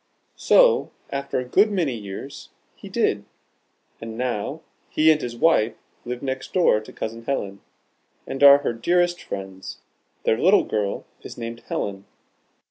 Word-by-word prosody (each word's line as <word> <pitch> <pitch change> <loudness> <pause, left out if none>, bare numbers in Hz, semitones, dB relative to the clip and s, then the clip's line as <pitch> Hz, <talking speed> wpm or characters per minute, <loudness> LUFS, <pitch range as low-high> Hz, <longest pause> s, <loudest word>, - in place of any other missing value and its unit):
So - - +4 0.2
after 140 0 -3
a 125 - -2
good 200 - +4
many 175 -10 0
years, 110 +6 -8 0.3
he - - -11
did, - - 0 0.8
and 115 0 -7
now 125 +4 -3 0.3
he 155 +1 +4
and 155 -1 +1
his 120 -1 -5
wife 120 -6 +3 0.3
live 125 +1 -5
next 130 -1 -4
door 175 -12 +4
to 110 - -12
Cousin 115 +1 -6
Helen, 100 -7 -3 0.6
and 135 - -6
are 140 0 +10
her 120 - 0
dearest 175 +8 +1
friends. 95 -1 -7 0.5
Their 110 - +2
little 190 +4 +5
girl 105 -2 -2 0.2
is - - -10
named 115 0 -6
'Helen.' 100 -1 -4
125 Hz, 145 wpm, -23 LUFS, 110-155 Hz, 0.8 s, are